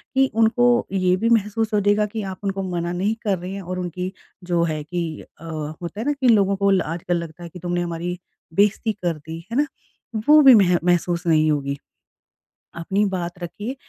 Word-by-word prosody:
कि 270 0 +4
उनको 225 +2 +3 0.3
ये 185 -1 +2
भी 225 +4 +1
महसूस 220 0 +1
हो 210 - +4
जाएगा 205 +1 +3
कि 215 +1 -5
आप 185 - -9
उनको 195 -1 -2
मना 175 -2 -2
नहीं 195 +5 0
कर 200 -3 +1
रहे 180 +2 -7
हैं 200 - -5
और 185 0 -5
उनकी 180 +1 -4 0.3
जो 175 -1 0
है 155 -2 -1
कि 175 +3 -3 0.2
अ, 165 - -16
होता 160 +5 -6
है 230 - -3
ना 290 - +2
कि 275 -3 0
लोगों 200 -4 +4
को 200 0 +1
ल 190 - +3
आजकल 175 +1 -2
लगता 170 0 -7
है 170 - -7
कि 180 - -11
तुमने 175 0 -2
हमारी 175 +1 -3 0.4
बेइज़्ज़ती 210 +4 +2
कर 175 -6 -2
दी, 160 +3 -9
है 235 - -1
ना? 295 - +3 0.6
वो 305 +1 +8
भी 270 -3 +9
मह 180 -4 +5
महसूस 175 0 +1
नहीं 155 -1 +4
होगी। 140 -1 -1 1.0
अपनी 190 +5 0
बात 180 -3 -3
रखिए, 195 +9 -5
180 Hz, 205 wpm, -22 LUFS, 170-210 Hz, 1.0 s, भी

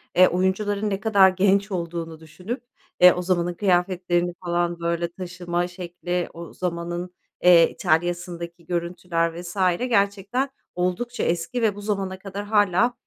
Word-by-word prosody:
eee, 185 +1 +7
oyuncuların 200 +3 0
ne 195 -1 -2
kadar 200 -2 +5
genç 195 +2 +2
olduğunu 170 -2 -4
düşünüp, 185 - -7 0.4
eee, 180 0 +9
o 180 - -3
zamanın 175 -1 0
kıyafetlerini 175 -2 +1
falan, 175 0 0
böyle, 170 0 -1
taşıma 175 -1 -3
şekli, 175 0 -4
o 170 0 -9
zamanın, 175 0 -4 0.3
eee, 175 -2 +7
İtalya'sındaki 175 0 -2
görüntüler 170 -1 -2
vs. 175 +1 -8 0.2
Gerçekten 230 +2 0 0.3
oldukça 185 +8 -2
eski 175 +9 -1
ve 215 -3 +2
bu 205 - -8
zamana 195 -2 -2
kadar 200 +1 -6
hâlâ, 205 +2 +3
180 Hz, 135 wpm, -24 LUFS, 175-200 Hz, 0.4 s, eee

